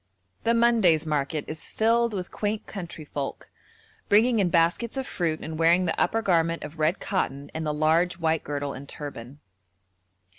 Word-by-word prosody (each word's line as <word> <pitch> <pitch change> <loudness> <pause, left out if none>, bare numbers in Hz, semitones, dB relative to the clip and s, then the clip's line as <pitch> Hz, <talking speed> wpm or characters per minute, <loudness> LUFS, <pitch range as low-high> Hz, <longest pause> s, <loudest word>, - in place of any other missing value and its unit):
The 230 +1 +3
Monday's 225 -10 +4
market 150 0 -1
is 155 0 -7
filled 230 0 +2
with 180 -2 -5
quaint 210 0 -2
countryfolk, 155 -7 -6 0.6
bringing 225 +3 +4
in 190 -3 +2
baskets 175 +9 +1
of 265 - -2
fruit 165 -9 -2
and 160 0 -6
wearing 170 +3 +4
the 165 - 0
upper 225 0 +1
garment 165 -3 +1
of 150 +2 -9
red 155 +4 +2
cotton 140 -8 -2
and 160 0 -3
the - - +1
large 160 +4 +2
white 160 -2 0
girdle 145 -1 -3
and 140 +1 -9
turban. 140 -1 -8
165 Hz, 160 wpm, -26 LUFS, 155-205 Hz, 0.6 s, Monday's